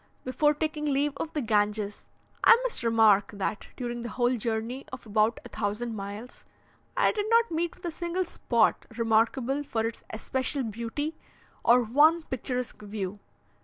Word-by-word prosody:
Before 295 +4 +2
taking 305 0 -2
leave 285 0 +1
of 325 - -4
the 300 - -1
Ganges, 210 -1 0 0.4
I - - +9
must - - -1
remark 220 -3 +4
that, 205 +1 -3
during 240 -2 -4
the 235 - -5
whole 245 +2 +1
journey 230 +3 -2
of 260 -2 -8
about 215 +2 +2
a - - -8
thousand 220 +2 -3
miles, 205 +4 -7 0.5
I - - +4
did 415 0 -2
not 465 -2 +4
meet 335 +1 -1
with 365 - -13
a 340 - -1
single 345 +3 -2
spot 235 -9 +1
remarkable 235 +4 +2
for 225 -6 -2
its 230 - -4
especial 260 +5 -1
beauty, 235 +8 -4 0.4
or 245 +1 +5
one 300 +8 +4
picturesque 250 -4 -4
view. 205 -1 -5
240 Hz, 160 wpm, -28 LUFS, 220-295 Hz, 0.5 s, I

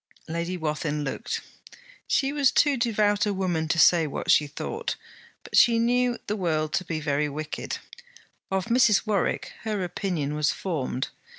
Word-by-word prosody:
Lady 170 +3 -3
Wathin 150 -2 -2
looked. 135 - -3 0.7
She 275 0 +1
was 285 -3 +3
too 290 -2 +3
devout 210 -4 +1
a 205 - 0
woman 175 -4 -1
to 165 - 0
say 165 0 +5
what 140 - -1
she 150 - +4
thought. 435 - -4 0.5
But - - -6
she 235 -1 +6
knew 245 +1 +2
the 210 - -2
world 155 -6 -1
to 185 - +1
be 165 -3 -3
very 145 0 0
wicked. 155 +2 -5 0.7
Of 190 -1 -1
Mrs. 235 -4 +4
Warwick, 205 -5 -1
her 210 -3 -2
opinion 175 -5 -2
was 150 0 +1
formed. 140 -8 -3
180 Hz, 160 wpm, -26 LUFS, 155-215 Hz, 0.7 s, she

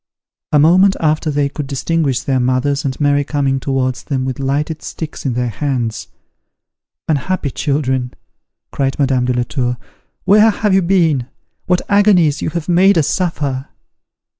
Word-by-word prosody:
A 150 - +4
moment 185 +6 +5
after 155 0 0
they 145 -1 +1
could 145 0 -6
distinguish 140 -1 -1
their 135 -2 0
mothers 130 +3 0
and 130 -2 -3
Mary 145 -1 +2
coming 140 -2 -1
towards 130 -2 -2
them 130 -3 -2
with 130 -1 -4
lighted 145 +4 -2
sticks 155 -3 -6
in 130 - -1
their 125 0 -1
hands. 120 -3 -3 1.0
"Unhappy 155 0 -1
children," 130 -3 -1 0.6
cried 135 -1 -1
Madame 135 -3 +1
de 125 - 0
la 120 0 0
Tour, 125 -1 -2 0.5
"where 210 +3 +5
have 210 -1 0
you 190 - +4
been? 165 -8 +1 0.4
What 180 0 +2
agonies 195 -7 +3
you - - -1
have 160 0 -4
made 185 +2 +4
us 155 - +2
suffer!" 145 -7 -2
145 Hz, 155 wpm, -16 LUFS, 130-165 Hz, 1.0 s, moment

